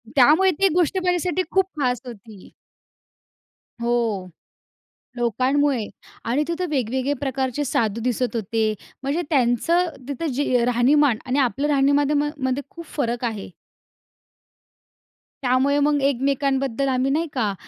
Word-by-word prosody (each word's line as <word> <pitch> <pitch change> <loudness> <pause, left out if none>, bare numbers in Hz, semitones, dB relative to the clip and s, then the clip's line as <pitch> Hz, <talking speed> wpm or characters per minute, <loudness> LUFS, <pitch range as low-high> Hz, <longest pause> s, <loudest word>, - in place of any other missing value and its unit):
त्यामुळे 305 +8 +5
ती 390 - +5
गोष्ट 355 +2 +1
माझ्यासाठी 360 -1 +1
खूप 385 0 +3
खास 250 -3 0
होती. 215 -4 -12 1.3
हो, 230 -5 0 0.9
लोकांमुळे 255 +1 +1 0.4
आणि 250 +6 +1
तिथं 340 +1 -2
वेगवेगळे 260 0 -1
प्रकारचे 270 0 -2
साधू 230 -4 0
दिसत 250 0 -1
होते. 220 0 0 0.3
म्हणजे 285 +6 -1
त्यांचं 295 +6 +2 0.2
तिथं 285 +4 -3
जे 250 -2 +1
राहणीमान 245 +1 +3
आणि 260 +2 0
आपलं 275 +2 +1
राहणीमान 285 +1 +2
मध्ये 260 +1 -1
खूप 335 -1 -10
फरक 240 -3 -1
आहे. 215 -5 -4 1.9
त्यामुळे 260 +3 +2
मग 290 0 +2
एकमेकांबद्दल 275 -1 0
आम्ही 260 +1 +1
नाही 320 +4 0
का, 220 -6 0
270 Hz, 115 wpm, -22 LUFS, 240-290 Hz, 1.9 s, त्यामुळे